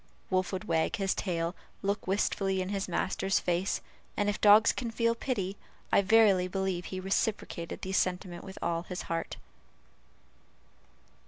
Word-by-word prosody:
Wolf 185 -1 +1
would 190 -1 -3
wag 160 0 +1
his 195 -1 0
tail, 170 -2 -2 0.3
look 200 0 -1
wistfully 195 0 +1
in 185 0 -2
his 195 -1 -2
master's 190 +2 0
face, 180 +2 0 0.4
and 205 0 +2
if 205 - -3
dogs 210 +1 +7
can 240 -3 -4
feel 230 0 +1
pity, 205 -6 -3 0.3
I - - +5
verily 200 -3 +5
believe 190 -1 -2
he 185 - -5
reciprocated 190 -3 -2
the 190 - -3
sentiment 180 -2 -1
with 190 -1 -9
all 170 0 0
his 180 +1 -6
heart. 165 0 -3
190 Hz, 150 wpm, -30 LUFS, 180-205 Hz, 0.4 s, dogs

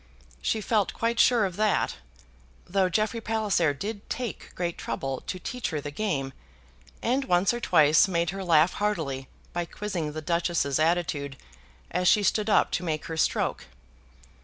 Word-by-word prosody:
She 220 - 0
felt 210 -2 +1
quite 230 0 0
sure 235 -4 +5
of 185 -1 -4
that; 215 -2 +1 0.7
though 190 0 +1
Jeffrey 215 +5 0
Palliser 215 -8 +1
did 205 +8 -6
take 245 -4 -4
great 175 -1 -2
trouble 135 -1 -4
to - - -3
teach 250 +7 -4
her 155 - -2
the 145 0 -6
game, 145 -8 -2 0.7
and 260 +3 +1
once 180 0 +3
or 240 - -3
twice 155 -5 +5
made 170 -2 0
her 195 0 -5
laugh 165 -1 +4
heartily 155 -11 -2 0.3
by 175 0 -1
quizzing 170 -5 -4
the 155 - -5
Duchess's 170 -4 0
attitude 155 -4 0 0.5
as 180 0 +1
she 210 - +5
stood 210 +2 +1
up - - +4
to - - -1
make 155 -3 -2
her 160 - -5
stroke. 160 - 0
180 Hz, 160 wpm, -27 LUFS, 155-210 Hz, 0.7 s, sure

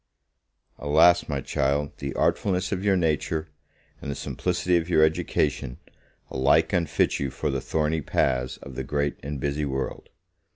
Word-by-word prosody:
Alas, 80 +4 +4
my 70 -2 -1
child, 70 +3 -1
the 70 -1 -4
artfulness 95 -2 +1
of 95 -1 -2
your 100 -2 +3
nature, 80 -1 0 0.5
and - - -6
the 70 - -2
simplicity 90 0 -1
of 85 0 0
your 80 -3 +5
education, 75 -4 0 0.5
alike 65 +1 +3
unfit 85 -4 +1
you 70 - -1
for 70 +3 -2
the 65 -1 -2
thorny 80 +2 0
paths 65 -2 0
of 70 - -9
the - - -4
great 70 -1 -1
and 70 0 -5
busy 70 +2 -1
world. 65 -2 -4
75 Hz, 155 wpm, -25 LUFS, 70-80 Hz, 0.5 s, your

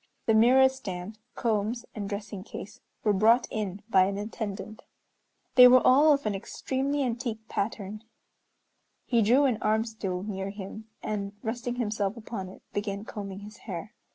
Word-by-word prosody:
The 225 - +3
mirror 250 +4 +7
stand, 210 -5 -6 0.2
combs, 225 +1 -1
and 205 -2 -5
dressing 200 -1 -5
case 210 -1 -9 0.2
were 210 - +3
brought 225 +5 +5
in 205 -3 -3
by 190 -5 +5
an 195 +1 -2
attendant. 215 0 -5 0.7
They 250 0 +10
were 255 0 +6
all 290 +4 +7
of 280 -3 +2
an 210 - +1
extremely 270 +7 -2
antique 235 -3 -3
pattern. 210 0 -3 1.0
He 235 -2 +3
drew 250 +7 +5
an 245 -5 +1
"arm 220 +1 +2
stool" 195 -5 -4
near 195 -2 -4
him, 205 +2 -8 0.2
and 200 -1 -3
resting 240 +2 -3
himself 215 -3 -1
upon 215 -4 -6
it 185 - -14
began 205 0 -3
combing 200 -2 -6
his 210 0 -11
hair. 190 +4 -5
215 Hz, 155 wpm, -28 LUFS, 200-235 Hz, 1.0 s, They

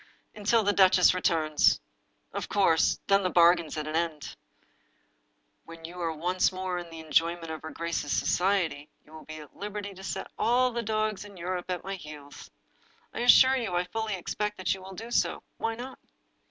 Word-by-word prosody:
"Ah, - - -10
until 220 +2 +3
the 205 0 +2
duchess 185 -2 +5
returns! 160 -4 +2 0.5
Of - - -4
course, 180 -6 +3
then 195 0 +4
the 185 - 0
bargain's 170 -2 +4
at 155 - -3
an 155 +1 -4
end. 160 -4 -2 1.3
When 165 0 -11
you 175 +2 -8
are 165 -1 -1
once 180 +5 +1
more 185 -1 -3
in 175 -1 -9
the 165 -1 -9
en 155 - -15
joyment 165 0 +1
of 160 - -6
her 160 - -7
grace's 170 -4 -3
society, 175 -6 0 0.2
you 155 - -19
will 155 - -11
be 155 - -8
at 150 - -15
liberty 205 0 -6
to 190 0 -12
set - - -5
all 250 +2 +3
the 235 0 -2
dogs 215 -2 -1
in 205 -2 -13
Europe 180 +1 -4
at 180 -1 -3
my 195 - -4
heels. 150 -5 -10 0.6
I - - -5
assure 260 +2 +7
you 220 -8 -2
I 175 - +2
fully 220 +2 -3
expect 210 +3 -3
that 185 - 0
you^will 190 0 -9
do 230 +5 -8
so - - 0
— - - -45
why 225 0 -1
not?" 255 +3 -8
180 Hz, 195 wpm, -28 LUFS, 165-205 Hz, 1.3 s, assure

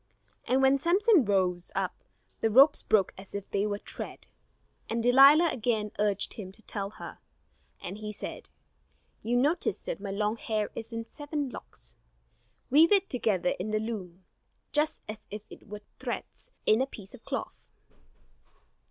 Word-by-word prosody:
And 265 +1 +2
when 270 +1 +5
Samson 370 - +4
rose 185 -3 0
up, - - -1 0.5
the 225 - +2
ropes 270 +7 +6
broke 200 -4 +2
as 195 +1 -9
if 200 -1 -5
they 200 +1 +1
were 205 -1 -2
thread. - - -9 0.6
And 230 0 -1
Delilah 275 +7 +7
again 220 -3 -1
urged 205 -1 +1
him 190 -4 -8
to 220 - -14
tell 200 -2 -4
her; 215 - -10 0.6
and 195 +4 -7
he 210 0 -5
said: 210 - -7 0.7
"You 240 +2 0
notice 295 +8 +2
that - - -5
my 200 - -5
long 210 +3 -1
hair 215 -2 -2
is 225 +1 -6
in 230 0 -4
seven 290 +1 -4
locks. - - -9 0.7
Weave 315 +6 +6
it 395 -1 +3
together 205 -8 +1
in 195 +4 -3
the 215 0 +1
loom, 190 -5 -6 0.5
just 300 +1 +1
as 215 0 -8
if 210 0 -7
it - - -13
were 210 0 -8
the - - -37 0.2
threads - - -5 0.2
in 215 +3 +4
a 265 - +1
piece 200 -7 -11
of 255 - -13
cloth." - - -5
220 Hz, 165 wpm, -29 LUFS, 205-270 Hz, 0.7 s, Delilah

